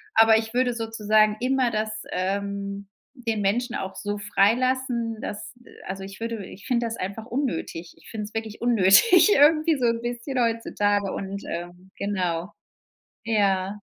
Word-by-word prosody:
Aber 225 Hz, 0 st, +7 dB
ich 220 Hz, +1 st, -4 dB
würde 250 Hz, -1 st, +2 dB
sozusagen 215 Hz, -2 st, +2 dB
immer 255 Hz, -1 st, +1 dB
das, 215 Hz, 0 st, -3 dB
ähm 200 Hz, +1 st, -3 dB, 0.4 s
den 220 Hz, -2 st, 0 dB
Menschen 235 Hz, +5 st, 0 dB
auch 190 Hz, 0 st, -5 dB
so 205 Hz, 0 st, -4 dB
freilassen, 230 Hz, +3 st, +1 dB
dass, 210 Hz, +1 st, -6 dB
äh, -, -, -16 dB, 0.2 s
also 190 Hz, 0 st, -5 dB
ich 195 Hz, +2 st, -11 dB
würde 230 Hz, -3 st, -4 dB
ich 195 Hz, -, -12 dB
finde 240 Hz, -2 st, +1 dB
das 230 Hz, 0 st, -3 dB
einfach 200 Hz, +4 st, -5 dB
unnötig. 235 Hz, -, -4 dB
Ich -, -, -16 dB
finde 215 Hz, -2 st, -5 dB
es 210 Hz, -, -12 dB
wirklich 225 Hz, -1 st, -5 dB
unnötig 240 Hz, -, +6 dB
irgendwie 310 Hz, +2 st, +5 dB
so 250 Hz, -, 0 dB
'n 230 Hz, 0 st, +1 dB
bisschen 240 Hz, +2 st, -3 dB
heutzutage 205 Hz, -3 st, 0 dB
und, 200 Hz, +1 st, -5 dB
ähm, 175 Hz, +2 st, -7 dB
genau. 185 Hz, -3 st, -2 dB, 0.7 s
Ja. 200 Hz, -2 st, +1 dB
215 Hz, 155 wpm, -25 LUFS, 200-235 Hz, 0.7 s, Aber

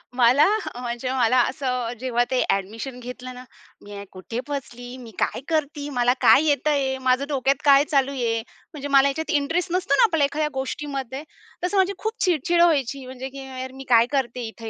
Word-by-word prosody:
मला 255 Hz, +4 st, +5 dB, 0.3 s
अ, 245 Hz, -, -9 dB
म्हणजे 240 Hz, +1 st, -3 dB
मला 255 Hz, -1 st, +2 dB
असं 250 Hz, -3 st, -3 dB
जेव्हा 245 Hz, -2 st, +1 dB
ते 255 Hz, -, +2 dB
ॲडमिशन 225 Hz, +6 st, -2 dB
घेतलं 250 Hz, +1 st, -8 dB
ना, 250 Hz, 0 st, -10 dB, 0.4 s
"मी 205 Hz, -, -12 dB
हे 200 Hz, -, -7 dB
कुठे 190 Hz, +5 st, -6 dB
फसली? 245 Hz, -3 st, -6 dB
मी 240 Hz, -3 st, -11 dB
काय -, -, -1 dB
करती? 295 Hz, -2 st, -2 dB
मला 245 Hz, 0 st, +3 dB
काय 300 Hz, -, +6 dB
येतंय? 285 Hz, -2 st, +1 dB
माझं 255 Hz, +1 st, +2 dB
डोक्यात 270 Hz, -1 st, 0 dB
काय 280 Hz, -1 st, +7 dB
चालू 275 Hz, -1 st, +2 dB
आहे?" 230 Hz, -4 st, -1 dB, 0.3 s
म्हणजे 285 Hz, -1 st, -6 dB
मला 275 Hz, 0 st, +5 dB
याच्यात 315 Hz, +3 st, -3 dB
इंटरेस्ट 335 Hz, +6 st, -2 dB
नसतो 370 Hz, +1 st, +1 dB
ना -, -, +6 dB
आपल्याला 325 Hz, -10 st, +3 dB
एखाद्या 300 Hz, +2 st, -1 dB
गोष्टीमध्ये 270 Hz, 0 st, -4 dB, 0.4 s
तसं 390 Hz, +3 st, -1 dB
माझी 385 Hz, +1 st, +3 dB
खूप 440 Hz, +3 st, -3 dB
चिडचिड 340 Hz, 0 st, +2 dB
व्हायची 275 Hz, -5 st, +2 dB
म्हणजे, 260 Hz, +1 st, -7 dB
की 270 Hz, 0 st, -9 dB
"यार 260 Hz, 0 st, -6 dB
मी 270 Hz, -, -9 dB
काय 235 Hz, -1 st, +6 dB
करते 250 Hz, -3 st, -2 dB
इथे 225 Hz, 0 st, -8 dB
265 Hz, 190 wpm, -23 LUFS, 245-285 Hz, 0.4 s, काय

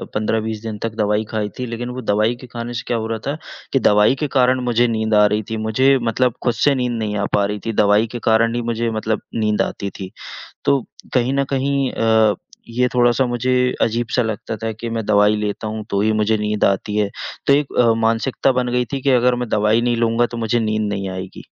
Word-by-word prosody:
15-20 110 Hz, 0 st, -1 dB
दिन 110 Hz, -2 st, -5 dB
तक 115 Hz, -1 st, -3 dB
दवाई 105 Hz, 0 st, +1 dB
खाई 105 Hz, -2 st, -2 dB
थी 125 Hz, -, -2 dB
लेकिन 120 Hz, +1 st, -5 dB
वो 125 Hz, +1 st, -5 dB
दवाई 110 Hz, +1 st, +1 dB
के 130 Hz, -, -10 dB
खाने 120 Hz, 0 st, -6 dB
से 120 Hz, -, -4 dB
क्या 120 Hz, -, 0 dB
हो 110 Hz, 0 st, -3 dB
रहा 115 Hz, 0 st, -3 dB
था 145 Hz, +2 st, -2 dB, 0.4 s
कि 135 Hz, -, +4 dB
दवाई 105 Hz, +2 st, +4 dB
के -, -, +1 dB
कारण 130 Hz, 0 st, +4 dB
मुझे 120 Hz, 0 st, +2 dB
नींद 110 Hz, -1 st, -1 dB
आ 105 Hz, 0 st, +6 dB
रही 105 Hz, +1 st, +1 dB
थी 110 Hz, -, -2 dB
मुझे 130 Hz, +5 st, +4 dB
मतलब 120 Hz, +1 st, +1 dB
खुद 120 Hz, -, +2 dB
से 140 Hz, +5 st, +2 dB
नींद 125 Hz, -2 st, -1 dB
नहीं 105 Hz, -1 st, -2 dB
आ 100 Hz, -, 0 dB
पा 100 Hz, -1 st, +3 dB
रही 105 Hz, +1 st, -3 dB
थी 115 Hz, -, -2 dB
दवाई 105 Hz, +2 st, +3 dB
के 120 Hz, -, -5 dB
कारण 115 Hz, +1 st, +3 dB
ही 120 Hz, -, -1 dB
मुझे 115 Hz, 0 st, -1 dB
मतलब 110 Hz, 0 st, -2 dB
नींद 105 Hz, -2 st, +1 dB
आती 100 Hz, -, -3 dB
थी। 95 Hz, -1 st, -6 dB, 0.5 s
तो 140 Hz, -, +4 dB, 0.3 s
कहीं 125 Hz, +1 st, +2 dB
न 140 Hz, 0 st, +2 dB
कहीं 135 Hz, 0 st, 0 dB
अ, 110 Hz, -2 st, +3 dB, 0.3 s
ये 125 Hz, +2 st, +1 dB
थोड़ा-सा 120 Hz, +1 st, +3 dB
मुझे 120 Hz, +1 st, -1 dB, 0.3 s
अजीब-सा 115 Hz, +2 st, +1 dB
लगता 110 Hz, -1 st, -3 dB
था 110 Hz, +2 st, -3 dB
कि 110 Hz, +2 st, -6 dB
मैं 115 Hz, -1 st, -3 dB
दवाई 105 Hz, 0 st, +4 dB
लेता 105 Hz, +1 st, -3 dB
हूँ 110 Hz, 0 st, -4 dB
तो 100 Hz, -, 0 dB
ही 110 Hz, +1 st, +2 dB
मुझे 110 Hz, +1 st, +1 dB
नींद 105 Hz, 0 st, -1 dB
आती 100 Hz, +2 st, 0 dB
है 105 Hz, -1 st, +1 dB, 0.4 s
तो 140 Hz, -, +6 dB
एक 145 Hz, 0 st, +1 dB
अ, 115 Hz, -2 st, +5 dB
मानसिकता 115 Hz, +4 st, +1 dB
बन 125 Hz, -1 st, -1 dB
गई 125 Hz, 0 st, +1 dB
थी 135 Hz, -, -2 dB
कि 140 Hz, -, +1 dB
अगर 125 Hz, 0 st, +3 dB
मैं 120 Hz, -1 st, -4 dB
दवाई 105 Hz, +2 st, +2 dB
नहीं 120 Hz, 0 st, +1 dB
लूँगा 115 Hz, +1 st, +2 dB
तो 120 Hz, -, -5 dB
मुझे 115 Hz, +1 st, 0 dB
नींद 110 Hz, -1 st, 0 dB
नहीं 95 Hz, -1 st, -3 dB
आएगी। 95 Hz, 0 st, -7 dB
115 Hz, 235 wpm, -20 LUFS, 105-125 Hz, 0.5 s, आ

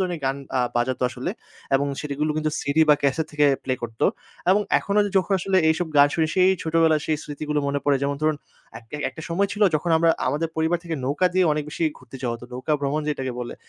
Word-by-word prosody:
ধরনের 180 Hz, -4 st, -2 dB
গান 135 Hz, +1 st, 0 dB, 0.2 s
আ -, -, +3 dB, 0.2 s
বাজাতো 125 Hz, +2 st, 0 dB
আসলে। 130 Hz, +7 st, -4 dB, 0.4 s
এবং 140 Hz, +1 st, +2 dB
সেটি 145 Hz, -2 st, -4 dB
গুলো 155 Hz, 0 st, +1 dB
কিন্তু 155 Hz, 0 st, 0 dB
সিডি 145 Hz, +3 st, +2 dB
বা 150 Hz, -, +8 dB
ক্যাসেট 145 Hz, +3 st, +1 dB
থেকে 150 Hz, -1 st, +3 dB, 0.2 s
প্লে 130 Hz, -, 0 dB
করত। 115 Hz, -1 st, -7 dB, 0.5 s
এবং 200 Hz, +2 st, +4 dB, 0.2 s
এখনো 200 Hz, +1 st, -1 dB, 0.2 s
যখন 190 Hz, +2 st, -1 dB
আসলে 195 Hz, +1 st, 0 dB
এইসব 160 Hz, +2 st, +1 dB
গান 145 Hz, 0 st, +7 dB
শুনি 160 Hz, -1 st, +2 dB
সেই 185 Hz, 0 st, +5 dB
ছোটবেলায় 160 Hz, -2 st, +2 dB
সেই 155 Hz, -, +1 dB
স্মৃতিগুলো 150 Hz, 0 st, -3 dB
মনে 140 Hz, 0 st, 0 dB
পড়ে 145 Hz, -1 st, +3 dB
যেমন 140 Hz, 0 st, 0 dB
ধরুন, 155 Hz, -1 st, +2 dB, 0.4 s
একটা 115 Hz, +5 st, -14 dB
একটা 160 Hz, -, -10 dB
সময় 195 Hz, +4 st, +1 dB
ছিল 210 Hz, -1 st, -1 dB
যখন 165 Hz, +3 st, 0 dB
আমরা 165 Hz, 0 st, +4 dB, 0.2 s
আমাদের 155 Hz, +4 st, -1 dB
পরিবার 160 Hz, +2 st, +1 dB
থেকে 165 Hz, -1 st, -3 dB
নৌকা 145 Hz, +7 st, +1 dB
দিয়ে 185 Hz, -1 st, +4 dB
অনেক 150 Hz, 0 st, -2 dB
বেশি 165 Hz, -, -2 dB
ঘুরতে 130 Hz, +1 st, -12 dB
যাওয়া 120 Hz, -2 st, -1 dB
হতো। 120 Hz, -, -12 dB
নৌকা 130 Hz, +5 st, -2 dB
ভ্রমণ 145 Hz, +2 st, -1 dB
যেটাকে 130 Hz, -3 st, -2 dB
বলে। 120 Hz, -, -5 dB
150 Hz, 220 wpm, -23 LUFS, 140-165 Hz, 0.5 s, বা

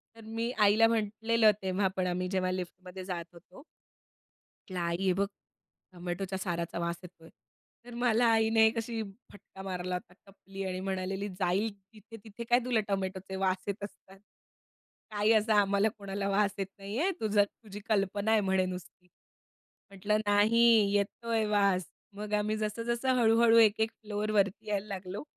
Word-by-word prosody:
तर 225 Hz, -, -13 dB
मी 230 Hz, +1 st, -1 dB
आईला 215 Hz, +2 st, +6 dB
म्हटलेलं 225 Hz, 0 st, +2 dB
तेव्हा 190 Hz, +1 st, 0 dB
पण 185 Hz, -1 st, +1 dB
आम्ही 180 Hz, +1 st, -1 dB
जेव्हा 185 Hz, -1 st, 0 dB
लिफ्टमध्ये 185 Hz, +1 st, -6 dB
जात 175 Hz, -3 st, -4 dB
होतो. 170 Hz, +1 st, -17 dB, 0.9 s
म्हटलं 185 Hz, -2 st, -9 dB
आई 170 Hz, 0 st, -1 dB
हे 190 Hz, -1 st, +2 dB
बघ 200 Hz, +2 st, 0 dB, 0.7 s
टोमॅटोच्या 180 Hz, +2 st, -4 dB
साराचा 170 Hz, -2 st, -3 dB
वास 170 Hz, 0 st, -1 dB
येतोय. 165 Hz, -2 st, -14 dB, 0.6 s
तर 245 Hz, -, -10 dB
मला 240 Hz, -1 st, +3 dB
आईने 220 Hz, 0 st, +4 dB
कशी 230 Hz, 0 st, -3 dB, 0.3 s
फटका 195 Hz, -1 st, -13 dB
मारला 180 Hz, -1 st, -3 dB
होता 180 Hz, 0 st, -8 dB
टपली 195 Hz, 0 st, -9 dB
आणि 185 Hz, -1 st, -3 dB
म्हणालेली, 190 Hz, +1 st, -3 dB
"जाईल 195 Hz, +4 st, +1 dB, 0.2 s
तिथे, 225 Hz, +2 st, -13 dB
तिथे 220 Hz, +1 st, -8 dB
काय 245 Hz, +1 st, +5 dB
तुला 245 Hz, -3 st, +2 dB
टोमॅटोचे 190 Hz, -1 st, -3 dB
वास 190 Hz, -1 st, 0 dB
येत 200 Hz, 0 st, -4 dB
असतात. 195 Hz, -1 st, -11 dB, 0.9 s
काही 210 Hz, +1 st, +2 dB
असा 215 Hz, 0 st, +3 dB
आम्हाला 200 Hz, +2 st, +2 dB
कोणाला 200 Hz, -1 st, -3 dB
वास 200 Hz, 0 st, +2 dB
येत 195 Hz, -1 st, -2 dB
नाहीये. 220 Hz, -, -1 dB
तुझं, 210 Hz, -2 st, +3 dB
तुझी 205 Hz, 0 st, -10 dB
कल्पना 205 Hz, +1 st, +1 dB
आहे 220 Hz, -, +4 dB
म्हणे 190 Hz, -1 st, +1 dB
नुसती." 180 Hz, 0 st, -8 dB, 0.8 s
म्हटलं 205 Hz, +2 st, 0 dB
"नाही 205 Hz, +3 st, +4 dB, 0.3 s
येतोय 220 Hz, +2 st, 0 dB
वास." 200 Hz, -3 st, +2 dB, 0.3 s
मग 210 Hz, 0 st, -6 dB
आम्ही 210 Hz, +1 st, +1 dB
जसं 215 Hz, +2 st, -3 dB
जसं 235 Hz, +2 st, -1 dB
हळू-हळू 230 Hz, 0 st, +5 dB
एक 220 Hz, -2 st, +5 dB
एक 220 Hz, -, +1 dB
फ्लोर 210 Hz, 0 st, -4 dB
वरती 200 Hz, -1 st, +1 dB
यायला 205 Hz, 0 st, -1 dB
लागलो, 195 Hz, +3 st, -6 dB
200 Hz, 155 wpm, -30 LUFS, 185-220 Hz, 0.9 s, आईला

